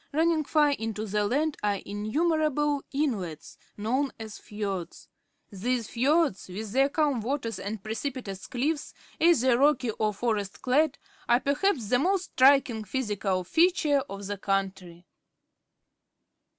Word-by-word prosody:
Running 320 +1 +2
far 295 0 +3
into 220 -5 -3
the 210 0 0
land 300 +6 0
are 205 -1 +1
innumerable 295 - 0
inlets, 195 - -3 0.2
known 255 +7 0
as 220 -2 -8
fiords. 200 -4 -5 0.4
These 230 +3 -2
fiords, 280 - +1
with 200 +3 -6
their 270 +4 +3
calm 285 -5 +1
waters 235 -1 -3
and 205 0 -5
precipitous 220 -3 -5
cliffs, 285 +5 -2 0.2
either 260 -8 +4
rock} 285 -2 +4 0.2
or 215 -1 +2
forest 205 -2 -2
clad, 280 +3 +2 0.3
are 240 +1 +5
perhaps 280 - 0
the 245 0 +3
most 370 +4 0
striking 260 -4 +4
physical 205 -5 -1
feature 320 - +3
of 195 +1 -7
the 205 0 -4
country. 190 -3 -3
245 Hz, 125 wpm, -27 LUFS, 205-290 Hz, 0.4 s, are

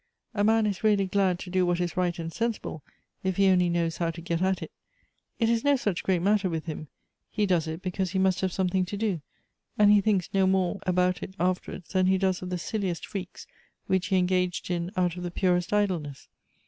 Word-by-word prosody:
A 205 -2 0
man 220 +1 +4
is 205 -1 -2
really 205 -2 +3
glad 190 -1 +1
to 180 0 -8
<lo 185 0 +2
what 175 0 +1
is 175 -2 -1
I'ight 180 -2 0
and 165 -1 -5
sensible, 230 -8 -3 0.4
if 190 -1 -1
he 195 -1 +5
only 180 -1 +4
knows 170 -1 0
how 170 -1 0
to 165 +1 -6
get 170 0 -2
at 190 0 +1
it. - - -9 0.7
It 230 - +2
is 230 0 +1
no 285 0 +4
such 205 -8 -1
great 180 -3 0
matter 200 -1 +2
with 160 -2 -3
him; 155 -2 -6 0.4
he 210 -1 0
does 175 -4 +1
it 160 +3 -5
because 185 0 -2
he 190 - -2
must 190 -1 +2
have 190 -1 0
something 185 0 +1
to 200 +3 -5
do, 200 -6 -1 0.6
and 205 -1 +6
he 205 -1 +6
thinks 195 -4 0
no 190 -1 +3
more 190 +1 +1
about 180 -1 +2
it 190 - -7
afterwards 180 0 -2
tlian 185 -1 +3
he 190 0 +4
does 190 -1 0
of 180 - -5
the 180 - -2
silliest 185 -1 -3
freaks 190 -4 -7 0.4
which 190 -1 0
he 190 - +2
engaged 180 0 0
in 170 0 -1
out 180 -1 +1
of - - -5
the 175 - -3
purest 180 0 0
idleness. 180 -9 -1
185 Hz, 225 wpm, -27 LUFS, 175-195 Hz, 0.7 s, and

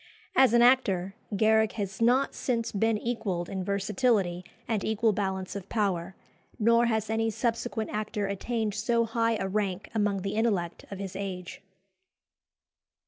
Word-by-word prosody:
As 260 -3 +6
an 235 0 +6
actor, 195 -7 +3 0.2
Garrick 220 0 +3
has 200 -1 -4
not 250 +4 +3
since 230 -3 -1
been 220 +2 +1
equalled 205 -7 -2
in 190 -1 -3
versatility 200 -2 +1 0.2
and 220 -4 -1
equal 220 0 +2
balance 190 -1 -2
of 200 -1 -7
power; 190 -4 -1 0.4
nor 230 +2 +4
has 220 -2 0
any 225 +1 0
subsequent 230 0 -2
actor 210 -1 -2
attained 215 +2 -2
so 230 +3 +1
high 230 0 +1
a 195 - -2
rank 195 -1 -2
among 205 -3 0
the 195 - -2
intellect 200 -7 -1
of 200 - -6
his 195 -1 -6
age. 185 -2 -5
210 Hz, 145 wpm, -28 LUFS, 195-230 Hz, 0.4 s, As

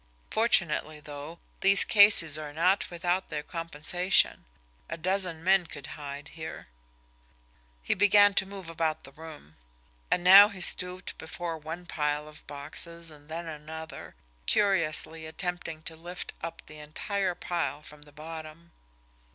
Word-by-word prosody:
Fortunately, 155 -9 +2
though, 150 +2 -9 0.2
these 200 +1 +6
cases 200 -7 +6
are 150 -1 -6
not 180 +5 +1
without 175 +2 -1
their 150 0 -3
compensation 165 +3 +1 0.4
a - - -4
dozen 180 -1 0
men 190 -1 +3
could 140 -3 -9
hide 145 0 -8
here." 160 - -9 1.1
He - - +1
began 205 +1 +5
to 195 0 +1
move 195 -3 -9
about 160 -1 -2
the 135 - -11
room. 150 - -13 0.5
And 175 - +1
now 195 +3 +10
he 200 -3 -10
stooped 180 +1 -1
before 165 +1 -5
one 160 +3 -8
pile 150 -2 -2
of 155 - -14
boxes 160 +3 -6
and 145 0 -17
then 165 +2 -5
another, 160 0 -9 0.3
curiously 165 -5 +1
attempting 165 -1 -5
to 160 - -6
lift 175 +2 -7
up 165 - -7
the 155 0 -12
entire 180 +5 -3
pile 150 -6 -3
from 150 -1 -13
the 150 0 -12
bottom. 160 +2 -10
165 Hz, 140 wpm, -28 LUFS, 155-180 Hz, 1.1 s, now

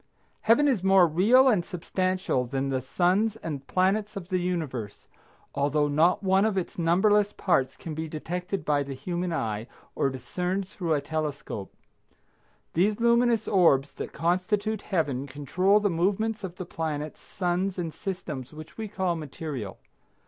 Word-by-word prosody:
Heaven 235 +7 +4
is 250 -9 +2
more 190 -1 +6
real 210 - +5
and 210 -9 +3
substantial 185 -6 -1
than 135 +2 -2
the 130 -1 0
suns 185 - +1
and 145 -10 -6
planets 200 +3 +1
of 185 -3 -7
the 185 - +1
universe, 155 - -3 0.5
although 145 +1 +1
not 165 +7 +3
one 190 0 +4
of 215 -3 +1
its 180 -1 -3
numberless 205 +5 +3
parts 135 -8 +1
can 160 - -6
be 160 +1 -4
detected 180 +5 -4
by 145 -1 +2
the 140 -1 -5
human 175 +4 -3
eye, 110 -8 -2 0.3
or 135 - +1
discerned 180 +9 -3
through 170 -5 -1
a 145 - 0
telescope. 150 -10 -4 1.0
These 205 +6 +2
luminous 235 -1 +3
orbs 155 -8 +4
that - - -6
constitute 200 +5 0
Heaven 145 -7 -1
control 165 +9 +2
the 205 -2 +1
movements 205 +5 0
of 180 -2 -5
the 185 - -6
planets, 155 -3 -4
suns 185 +1 -2
and 165 -3 -3
systems 155 -9 -5
which 155 +6 -11
we 220 - -3
call 190 -4 -1
material. 145 -8 -6
175 Hz, 155 wpm, -27 LUFS, 150-195 Hz, 1.0 s, more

